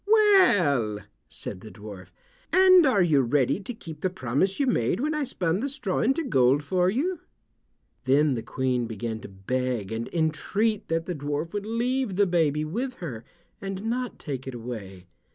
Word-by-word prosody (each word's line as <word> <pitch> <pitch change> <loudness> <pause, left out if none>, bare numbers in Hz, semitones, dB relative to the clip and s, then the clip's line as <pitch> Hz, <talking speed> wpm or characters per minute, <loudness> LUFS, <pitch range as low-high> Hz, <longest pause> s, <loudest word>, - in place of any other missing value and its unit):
"Well," 230 - +4 0.3
said 90 - -7
the 110 - -10
dwarf, 105 -3 -10 0.4
"and 370 -4 +7
are 205 -8 +4
you 150 -5 +4
ready 130 +5 +1
to 205 +4 -6
keep 170 -10 -10
the 185 - +1
promise 185 - -1
you 280 - +3
made 175 - +1
when 300 +4 0
I 300 -1 -1
spun 180 -8 -1
the 275 +5 -2
straw 255 -10 -2
into 270 +7 +1
gold 135 - +3
for 180 +4 +1
you?" 315 - -1 0.9
Then 140 +2 +3
the 115 - -2
Queen 125 0 -1
began 110 0 -4
to 105 - -10
beg 115 +2 -3
and 115 +1 -3
entreat 200 +7 0
that 165 0 -1
the 180 - -3
dwarf 145 +2 -3
would 205 0 -3
leave 240 -1 -1
the 200 +1 +4
baby 155 -4 +1
with 240 +11 -3
her, 125 -10 -7 0.4
and 195 0 -5
not 245 +2 -2
take 135 -4 -6
it 130 - -5
away. 105 -6 -7
165 Hz, 175 wpm, -26 LUFS, -, 0.9 s, and